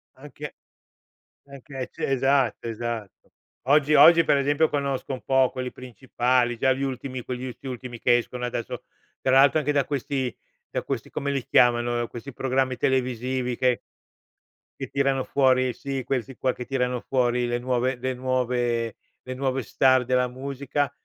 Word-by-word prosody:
Anche 145 +2 -9 0.9
anche, 140 0 -11
e 130 - -3
ce - - -3
esatto, 135 -3 +1
esatto. 115 -3 -6 0.4
Oggi 150 +1 +4
oggi, 165 +1 +8
per 140 - +3
esempio, 145 +3 +2
conosco 140 -2 -2
un 130 - -5
po' 135 -1 +3
quelli 130 -1 -4
principali, 125 -1 -1
già 130 +3 +3
gli 135 +1 -3
ultimi 130 -1 -4
quegli 125 +1 -5
ulti 130 +2 -8
ultimi 125 -1 -6
che 120 +1 +4
escono 125 +1 -4
adesso, 120 -1 -4 0.4
tra 130 - +1
l'altro 140 +3 +6
anche 150 -1 0
da 140 -2 +2
questi 135 -2 -2 0.4
da - - -2
questi - - -4
come 140 - -3
li 135 -3 -2
chiamano? 120 0 +3
Uhm, 120 - -1
questi 125 +3 -8
programmi 130 0 0
televisivi 125 -1 0
che 125 -2 +2 1.0
che - - -4
tirano 135 -1 +1
fuori, 130 -2 +2
sì, 135 +1 -4
questi 130 0 -3
qua, 130 - 0
che 125 - -7
tirano 125 -2 -1
fuori 125 -2 +1
le 120 0 -1
nuove 125 +1 0
le 130 +1 -2
nuove 125 -3 -1 0.3
le 130 - -6
nuove 135 0 -1
star 130 +1 +3
della 125 0 +1
musica, 140 +2 -3
130 Hz, 160 wpm, -25 LUFS, 125-135 Hz, 1.0 s, oggi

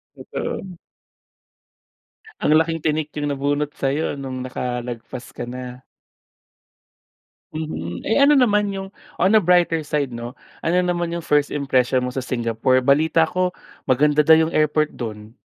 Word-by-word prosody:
Totoo. 185 -3 -6 1.6
Ang 155 - +4
laking 165 0 0
tinik 155 0 -1
yung 145 -1 -2
nabunot 145 +1 -1
sayo 140 +2 -1
nung 130 -2 -5
nakalagpas 125 -1 -5
ka - - -5
na. 125 +1 -8 1.7
Mhm. 90 - -5
Eh, 220 - +2
ano 295 - +6
naman 210 -4 +3
yung, 195 0 -5 0.3
on 190 +5 +4
a 215 - +6
brighter 175 -2 +3
side, 145 -3 -2
'no? 120 +1 -6 0.3
Ano 175 +3 +2
naman 175 -1 -1
yung 170 -1 -4
first 145 -1 +2
impression 130 -3 +1
mo - - -2
sa 130 -1 -3
Singapore? 120 +1 +1
Balita 160 +4 +3
ko 180 +2 0 0.3
maganda 150 +3 +3
daw 160 +1 +7
yung 165 - -7
airport 155 0 +1
dun. 110 -1 -7
145 Hz, 140 wpm, -21 LUFS, 125-165 Hz, 1.7 s, daw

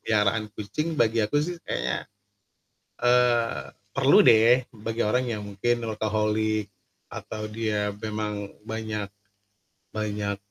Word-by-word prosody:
peliharaan 110 0 +1
kucing 155 +10 -3
bagi 115 -3 +3
aku 110 +7 0
sih 175 +4 -2
kayaknya, - - -2 1.0
eee, 120 -1 +3 0.3
perlu - - +5
deh, 115 +3 +6 0.2
bagi 115 +1 -2
orang 125 +4 +2
yang 110 -3 -3
mungkin 100 +4 0
workaholic, 110 -1 0 0.4
atau 110 - -6
dia 105 -2 -1
memang 105 -2 -3 0.2
banyak 110 -2 -3 0.9
banyak 105 -1 -2
110 Hz, 110 wpm, -26 LUFS, 105-115 Hz, 1.0 s, deh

